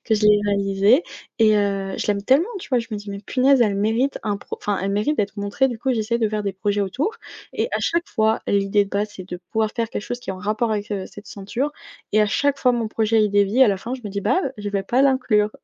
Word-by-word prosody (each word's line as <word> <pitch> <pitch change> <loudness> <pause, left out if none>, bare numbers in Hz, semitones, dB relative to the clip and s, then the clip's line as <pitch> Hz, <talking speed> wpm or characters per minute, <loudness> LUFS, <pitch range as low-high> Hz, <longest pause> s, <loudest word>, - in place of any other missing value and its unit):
que 220 - +2
je 215 - -1
l'ai 210 0 +5
réalisée 200 - +3 0.4
et 215 -1 +5
heu, 195 -1 0
je - - -2
l'aime 200 -1 0
tellement, 280 - +3
tu 345 - -11
vois? 250 - +3
Je 230 - -4
me 215 - -3
dis: 205 0 -8
«Mais 200 - -5
punaise, 260 +4 +3
elle 210 -4 +3
mérite 225 +7 0
un 205 -1 -2
pro» - - -7
enfin, 205 -2 -1
elle 195 - -1
mérite 210 +10 0
d'être 205 0 -1
montrée, 205 +7 0
du 235 -3 -5
coup, 265 +1 0
j'essaie 230 0 0
de 225 -2 +1
faire 210 -1 -2
des 200 -2 -3
projets 205 +1 -1
autour 260 - -1 0.4
et - - -1
à - - +1
chaque 340 0 0
fois 220 -1 +1
l'idée 200 0 +2
de - - -15
base, 205 +1 -1
c'est 185 0 -9
de 180 - -5 0.2
pouvoir 220 -1 +1
faire 230 -1 -1
quelque - - -3
chose 245 - -4
qui 195 - -6
est - - -2
en 185 - -8
rapport 215 +4 -1
avec, 210 0 -3
heu, 190 -2 -3
cette 205 0 -13
ceinture 230 +9 -3 0.4
et 215 0 +5
à - - +2
chaque 285 +6 +1
fois 250 -1 +3
mon 230 -2 -1
projet, 220 0 +2
il 210 - +2
dévie, 205 +5 +3
à 240 - +6
la 195 - +1
fin, 230 +6 -7
je 260 - -8
me 210 - -5
dis: 200 0 -4
«Bah, 370 - +2
heu, 265 - -3
je 205 -1 -5
vais 195 -1 0
pas 250 +7 +2
l'inclure». 250 -6 +2
210 Hz, 285 wpm, -22 LUFS, 200-240 Hz, 0.4 s, à